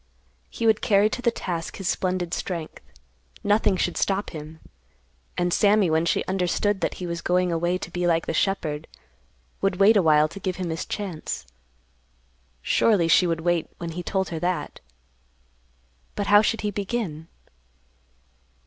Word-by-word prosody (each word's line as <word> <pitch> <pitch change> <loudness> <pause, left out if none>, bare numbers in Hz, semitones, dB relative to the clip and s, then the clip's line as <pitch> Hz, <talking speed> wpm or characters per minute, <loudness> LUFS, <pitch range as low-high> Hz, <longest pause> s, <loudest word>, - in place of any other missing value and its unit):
He 230 - -4
would 220 -1 +4
carry 205 +1 +3
to 250 - -3
the 240 - +3
task 175 -7 -4
his 195 - -4
splendid 180 -2 -1
strength. 170 -4 -4 0.6
Nothing 205 -2 +2
should 175 - -1
stop 195 +1 0
him. 155 0 -9 0.8
And 175 0 +1
Sammy, 205 -4 +4
when 160 +1 +2
she - - +1
understood 190 +2 0
that - - -1
he 180 - -6
was 170 -1 -4
going 180 +1 +1
away 175 +2 0
to - - -8
be 175 0 -1
like 165 -1 +2
the - - -2
shepherd, 160 -6 -1 0.7
would 195 -1 +1
wait 200 +4 +5
awhile 155 -5 +5
to 200 - -9
give 185 -1 -2
him 180 -3 -3
his 160 - -4
chance. 190 -7 -5 1.2
Surely, 200 -7 +3
she 175 +2 +5
would 165 -1 -1
wait 175 -1 0
when 170 -1 -5
he 175 +2 -5
told 190 0 -1
her 165 - -4
that. 175 -3 -2 1.4
But 205 - -2
how 205 +1 +6
should 225 +1 0
he 210 - -1
begin? 195 -6 -3
180 Hz, 160 wpm, -24 LUFS, 165-200 Hz, 1.4 s, how